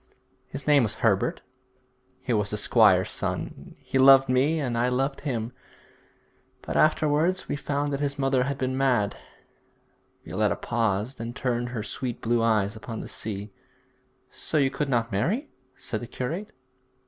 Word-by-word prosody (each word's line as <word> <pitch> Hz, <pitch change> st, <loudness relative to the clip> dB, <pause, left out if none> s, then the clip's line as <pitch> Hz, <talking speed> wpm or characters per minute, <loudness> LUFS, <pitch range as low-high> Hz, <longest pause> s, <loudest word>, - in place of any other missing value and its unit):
'His 140 Hz, +1 st, -7 dB
name 145 Hz, -2 st, +5 dB
was 110 Hz, -3 st, -1 dB
Herbert. 100 Hz, -4 st, +1 dB, 0.8 s
He 125 Hz, -, -1 dB
was 105 Hz, -2 st, +1 dB
the 105 Hz, -, -1 dB
squire's 105 Hz, -, +4 dB
son. -, -, -4 dB
He 135 Hz, -, -2 dB
loved 135 Hz, 0 st, +7 dB
me 140 Hz, +6 st, +2 dB
and 125 Hz, -5 st, -2 dB
I 120 Hz, +2 st, +2 dB
loved 135 Hz, +2 st, -1 dB
him, 120 Hz, -5 st, -3 dB, 1.1 s
but -, -, -5 dB
afterwards 155 Hz, +4 st, +2 dB
we -, -, -2 dB
found 145 Hz, 0 st, -2 dB
that 140 Hz, -, -1 dB
his 145 Hz, 0 st, -2 dB
mother 135 Hz, -2 st, +2 dB
had 140 Hz, 0 st, -2 dB
been 130 Hz, -1 st, -1 dB
mad 125 Hz, -6 st, +1 dB, 0.6 s
' -, -, -40 dB
Violetta -, -, 0 dB
paused 115 Hz, +1 st, -1 dB
and 115 Hz, +1 st, -5 dB
turned 120 Hz, -3 st, -1 dB
her 115 Hz, -4 st, -4 dB
sweet 120 Hz, +2 st, -4 dB
blue 120 Hz, +1 st, +1 dB
eyes 110 Hz, -2 st, +2 dB
upon 110 Hz, +1 st, -6 dB
the -, -, -7 dB
sea. 105 Hz, -1 st, -6 dB, 0.8 s
'So 155 Hz, -, -3 dB
you 135 Hz, -2 st, +3 dB
could 140 Hz, +1 st, -2 dB
not 115 Hz, -2 st, 0 dB
marry?' 195 Hz, -, -1 dB, 0.3 s
said 110 Hz, -4 st, -5 dB
the 120 Hz, -, -6 dB
curate. 165 Hz, -, -4 dB
125 Hz, 160 wpm, -26 LUFS, 115-140 Hz, 1.1 s, loved